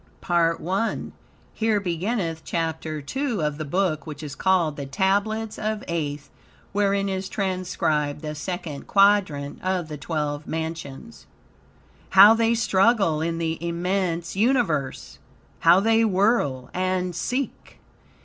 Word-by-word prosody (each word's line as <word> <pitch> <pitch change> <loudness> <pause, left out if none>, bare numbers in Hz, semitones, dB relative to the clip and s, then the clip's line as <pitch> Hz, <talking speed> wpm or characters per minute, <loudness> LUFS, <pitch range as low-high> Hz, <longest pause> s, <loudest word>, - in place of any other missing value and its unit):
PART 170 -1 +1
I 195 +5 0 0.6
Here 220 -2 +1
beginneth 175 -2 -2
Chapter 160 -2 -3
2 255 - -2
of 150 0 -2
the 155 - -3
Book 170 0 -1
which 150 0 -7
is 145 -2 -6
called 170 -2 +1
"The 140 -2 -6
Tablets 205 +8 0
of 215 0 -2
Aeth," 150 -4 -3 0.4
wherein 200 0 +1
is 190 -1 -3
transcribed 175 -7 -1
the 150 0 -4
Second 155 -2 -5
Quadrant 195 -8 +2
of 185 -3 -1
the 150 - -5
Twelve 150 -1 -3
Mansions. 160 +5 -6 0.8
"How 200 +3 +9
they 230 0 +2
struggle 195 -6 +2
in 165 +1 -1
the 165 0 -3
immense 170 0 -1
Universe! 200 - 0 0.4
How 170 +3 +6
they 225 +2 +3
whirl 190 - +1
and 185 -1 -1
seek! 250 - -4
180 Hz, 125 wpm, -24 LUFS, 155-200 Hz, 0.8 s, How